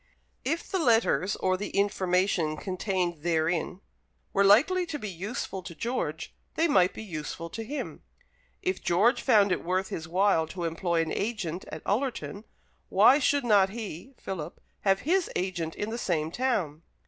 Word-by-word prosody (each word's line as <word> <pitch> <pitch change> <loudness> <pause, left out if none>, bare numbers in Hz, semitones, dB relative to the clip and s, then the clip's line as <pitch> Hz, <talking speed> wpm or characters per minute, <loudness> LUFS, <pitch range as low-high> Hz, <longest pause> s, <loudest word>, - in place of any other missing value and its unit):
If 330 +2 -2
the 380 - -1
letters 225 - +3
or 185 0 0
the 205 - -4
information 185 -5 +1
contained 185 -3 -2
therein 170 +2 0 0.5
were 200 - +4
likely 305 - +5
to 305 - -3
be 215 - -6
useful 190 +2 -4
to 175 -2 -9
George, 240 +9 -3 0.2
they 330 - +3
might 185 - +4
be - - -6
useful 165 -2 -6
to 225 - -5
him. 285 +6 -5 0.6
If 370 +1 -1
George 205 +9 +3
found 205 -6 +4
it 180 - 0
worth 185 +2 -1
his 160 -1 -5
while 180 -2 +2
to 175 +2 -6
employ 165 0 0
an 160 - -5
agent 195 -6 -3
at - - -7
Ullerton, 225 -2 -2 0.4
why 280 - +6
should 285 0 +2
not 200 -4 +5
he 220 - -7
(Philip) 170 -4 -6 0.2
have 195 -1 +2
his 355 +4 +1
agent 175 -3 -2
in 210 +2 -3
the 235 - -3
same 160 -7 -1
town? 190 - -1
195 Hz, 160 wpm, -28 LUFS, 170-230 Hz, 0.6 s, why